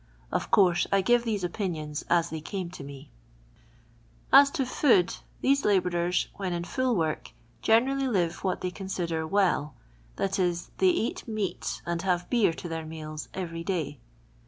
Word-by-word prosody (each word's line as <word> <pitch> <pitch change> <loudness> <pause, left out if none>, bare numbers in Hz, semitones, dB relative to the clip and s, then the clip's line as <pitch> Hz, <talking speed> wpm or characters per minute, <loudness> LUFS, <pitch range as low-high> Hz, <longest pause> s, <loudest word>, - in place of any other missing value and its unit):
Of - - -1
course 180 -5 +4
I 195 - +4
give 240 +4 +3
these 210 -4 -1
opinions 165 -5 -3
as 170 -1 +2
they 160 -1 -4
came 180 +1 -5
to 165 - -9
me. 140 -1 -10 1.2
Aii 280 +1 +8
to 275 -6 0
Food, 240 - +3 0.2
these 275 +1 +3
labourers, 180 -3 +1
when 190 -3 -2
in 170 0 -2
full 250 +8 0
work, 160 - -2 0.3
generally 265 +5 +3
live 180 -8 0
what 185 -2 -1
they 180 - -2
consider 170 -4 -3
well; 175 -7 +1 0.4
that 195 0 -1
is, 175 -1 0
they 380 - +5
eat 340 -11 -1
meat 215 -4 -3
and 170 -1 -2
have 180 -1 0
beer 235 -8 +4
to 165 - -7
their 165 -1 -4
meals 155 -1 -7
every 165 -3 -4
day. 160 -7 -2
180 Hz, 160 wpm, -28 LUFS, 165-210 Hz, 1.2 s, Aii